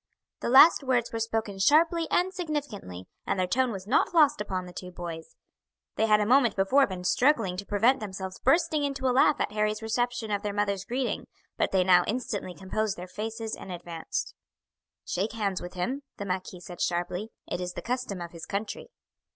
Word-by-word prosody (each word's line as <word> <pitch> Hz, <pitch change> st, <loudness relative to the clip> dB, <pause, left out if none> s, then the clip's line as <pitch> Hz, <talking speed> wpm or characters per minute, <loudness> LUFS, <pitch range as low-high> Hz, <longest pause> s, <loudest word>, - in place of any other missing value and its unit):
The -, -, -2 dB
last 275 Hz, +7 st, +8 dB
words 250 Hz, -3 st, 0 dB
were 230 Hz, -, -2 dB
spoken 220 Hz, -3 st, -2 dB
sharply 325 Hz, -, +4 dB
and 370 Hz, +1 st, +1 dB
significantly, 290 Hz, -, -5 dB, 0.2 s
and -, -, 0 dB
their 185 Hz, -, +2 dB
tone 250 Hz, +6 st, +1 dB
was 190 Hz, -3 st, -6 dB
not 255 Hz, -, +2 dB
lost 295 Hz, -6 st, +5 dB
upon 185 Hz, -3 st, -3 dB
the 180 Hz, -, -11 dB
two 180 Hz, -, -7 dB
boys; 170 Hz, -2 st, -8 dB, 0.6 s
they 220 Hz, -, +2 dB
had 210 Hz, -1 st, +5 dB
a 210 Hz, -, +1 dB
moment 245 Hz, -1 st, +4 dB
before 260 Hz, +9 st, +4 dB
been 185 Hz, -2 st, -6 dB
struggling 225 Hz, -2 st, +2 dB
to 200 Hz, -, -6 dB
prevent 230 Hz, +6 st, +3 dB
themselves 190 Hz, -2 st, -6 dB
bursting 305 Hz, +2 st, +2 dB
into 275 Hz, -2 st, -2 dB
a 250 Hz, -, +2 dB
laugh 270 Hz, +3 st, +4 dB
at -, -, -1 dB
Harry's 215 Hz, +1 st, -1 dB
reception 240 Hz, 0 st, -1 dB
of 205 Hz, -1 st, 0 dB
their 205 Hz, -1 st, -3 dB
mother's 200 Hz, -2 st, -1 dB
greeting, 250 Hz, +3 st, -2 dB, 0.3 s
but -, -, 0 dB
they 190 Hz, -1 st, +3 dB
now 180 Hz, -1 st, +6 dB
instantly 210 Hz, -6 st, -3 dB
composed 200 Hz, +2 st, -2 dB
their 180 Hz, +1 st, -7 dB
faces 220 Hz, +3 st, -4 dB
and 185 Hz, -, -9 dB
advanced. 170 Hz, -2 st, -5 dB, 0.7 s
"Shake 200 Hz, +5 st, -2 dB
hands 200 Hz, -4 st, -1 dB
with 175 Hz, +1 st, -8 dB
him," 250 Hz, +11 st, -2 dB, 0.2 s
the 200 Hz, -, -5 dB
marquis 185 Hz, -1 st, -4 dB
said 175 Hz, 0 st, -9 dB
sharply; 180 Hz, +4 st, -1 dB, 0.2 s
"it 175 Hz, -, -4 dB
is 180 Hz, 0 st, -4 dB
the -, -, -7 dB
custom 245 Hz, -7 st, -3 dB
of 170 Hz, -1 st, -6 dB
his 165 Hz, -2 st, -9 dB
country." 205 Hz, -, -4 dB
210 Hz, 195 wpm, -28 LUFS, 185-250 Hz, 0.7 s, last